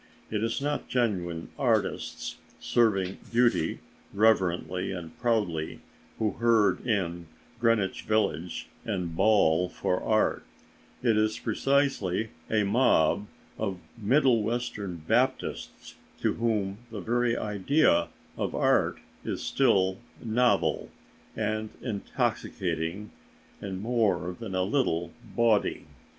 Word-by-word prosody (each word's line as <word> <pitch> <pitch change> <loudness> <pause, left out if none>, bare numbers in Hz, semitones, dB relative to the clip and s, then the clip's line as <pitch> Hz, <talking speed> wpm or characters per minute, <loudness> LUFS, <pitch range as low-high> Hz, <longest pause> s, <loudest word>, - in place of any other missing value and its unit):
It 105 0 -1
is 115 +3 0
not 145 +1 -2
genuine 90 -9 -1
artists, - - -1 0.2
serving 100 -5 +1
beauty 120 -8 +2 0.3
reverently 95 -3 +2
and 85 -4 -7
proudly, 105 -10 0 0.4
who 110 -2 +1
herd 115 -3 +3
in 85 -6 -1 0.3
Greenwich 115 -5 +1
Village 90 -6 -1 0.2
and 90 -6 -3
bawl 90 -4 +4
for 90 - -1
art; 110 -1 +1 0.6
it 115 -3 +3
is 110 0 +1
precisely 135 -8 +1 0.2
a 110 -1 +2
mob 100 -3 +3 0.3
of 100 -4 -2 0.2
Middle 120 +2 +3
Western 105 -7 -3
Baptists 130 +3 -1 0.3
to - - +1
whom 105 -4 -1
the 110 -2 -6
very 120 +3 +1
idea 105 - +2 0.3
of - - -2
art - - +2 0.3
is - - -3
still 95 -8 +2 0.2
novel, 110 -8 +1 0.5
and 110 0 -1
intoxicating, 95 -4 -2 0.5
and 95 -2 -4
more 100 -7 +1
than 105 -5 -5
a 95 - +2
little 95 - 0 0.2
bawdy. 115 -3 +2
105 Hz, 105 wpm, -28 LUFS, 90-115 Hz, 0.6 s, bawl